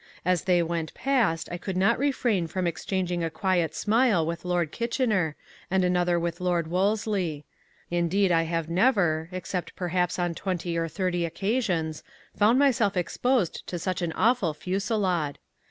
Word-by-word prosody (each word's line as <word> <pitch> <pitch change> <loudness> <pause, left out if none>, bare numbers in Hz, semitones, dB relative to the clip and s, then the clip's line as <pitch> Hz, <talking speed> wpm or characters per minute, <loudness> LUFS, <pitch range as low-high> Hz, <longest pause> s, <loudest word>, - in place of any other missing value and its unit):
As 180 -1 +1
they 180 -2 +3
went 165 -1 -3
past 230 -12 +1
I 175 - -4
could 185 +1 -4
not 190 +4 +3
refrain 240 -10 +1
from 185 +2 -2
exchanging 175 +1 -2
a 165 - 0
quiet 165 -1 0
smile 215 -6 +2
with 170 +1 -4
Lord 175 -3 0
Kitchener, 225 - 0 0.3
and 190 0 +2
another 180 -1 +2
with 170 +1 -3
Lord 175 -2 +1
Wolsley. 185 -3 0 0.5
Indeed 175 +3 +2
I 165 -1 +4
have 165 -2 -1
never, 170 -4 +2
except 180 0 -4
perhaps 180 -1 -1
on 175 -1 0
twenty 175 -1 -3
or 165 0 0
thirty 175 +1 -1
occasions, 170 -3 -1 0.3
found 215 +4 +4
myself 240 -8 +3
exposed 220 +3 0
to 175 - -3
such 185 +2 -2
an 170 -2 -1
awful 220 -9 +2
fusillade. 185 -3 -1
180 Hz, 155 wpm, -26 LUFS, 170-200 Hz, 0.5 s, I